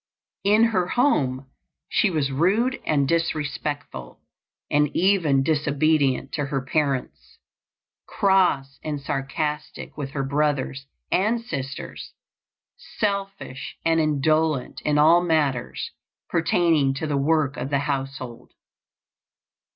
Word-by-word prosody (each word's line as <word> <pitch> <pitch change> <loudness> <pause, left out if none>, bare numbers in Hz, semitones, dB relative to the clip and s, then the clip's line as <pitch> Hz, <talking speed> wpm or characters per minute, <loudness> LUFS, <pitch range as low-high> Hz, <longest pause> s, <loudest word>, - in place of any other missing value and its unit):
In 210 +3 +4
her 190 -6 +2
home 140 - +1 0.4
she 210 - +2
was 150 -6 0
rude 205 - +1
and 140 -3 +2
disrespectful 150 - -3 0.5
and 150 0 +3
even 170 -8 +3
disobedient 145 -2 +1
to 145 -3 -2
her 140 -1 -1
parents; 140 -2 -2 0.7
cross 180 -9 +2
and 150 -2 -3
sarcastic 150 +2 -4
with 145 -3 -5
her 135 - -1
brothers 140 -1 -1 0.2
and 215 +5 +2
sisters; 135 - -6 0.8
selfish 195 -10 -3
and 165 0 +3
indolent 155 -1 +1
in 150 -1 +1
all 160 +4 +6
matters 150 -8 -1 0.4
pertaining 165 -4 +2
to 145 - -3
the 150 -2 -1
work 145 0 +1
of 125 +2 -4
the 140 - +1
household. 135 -4 -5
150 Hz, 105 wpm, -24 LUFS, 135-170 Hz, 0.8 s, all